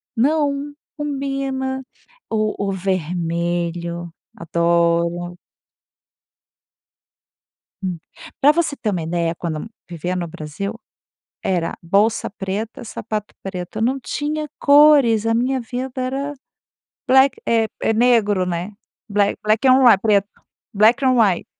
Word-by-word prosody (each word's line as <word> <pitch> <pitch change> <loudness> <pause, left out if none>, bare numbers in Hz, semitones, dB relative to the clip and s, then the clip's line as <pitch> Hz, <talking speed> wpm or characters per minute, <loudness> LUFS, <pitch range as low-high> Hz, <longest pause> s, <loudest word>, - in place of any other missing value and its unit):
não, 285 +2 +1 0.2
combina. 270 -2 -3 0.5
O 215 -2 -1
o - - 0
vermelho, 170 -1 -2 0.2
adoro. 170 +1 0 2.5
Hum. 180 -3 -3 0.4
Pra 290 +2 +6
você 305 -3 0
ter 215 - -2
uma 180 -4 -2
ideia, 170 0 -1
quando 165 +2 -5 0.2
vivia 175 +1 -4
no 175 -2 -3
Brasil 160 +8 -5 0.7
era 175 -3 0
bolsa 200 +6 +1
preta, 205 +3 -5
sapato 215 -2 -5
preto. 185 0 -6
Eu 220 - -2
não 260 +4 +1
tinha 300 +3 -3
cores, 285 -7 +6
a 225 - +2
minha 255 +3 0
vida 255 +2 -5
era 275 +3 -3 0.7
black 265 +1 +5
é 225 -1 +3
é 225 - +2
negro, 220 -5 +3
né, 175 +3 -3 0.4
bla 205 0 +3 0.2
black 215 +4 +2
on 260 +1 +6
whi 235 -5 +8
preto, 200 -1 +2 0.5
black 220 +6 +4
on 255 -1 +4
whi 195 -6 +3
215 Hz, 115 wpm, -20 LUFS, 175-265 Hz, 2.5 s, whi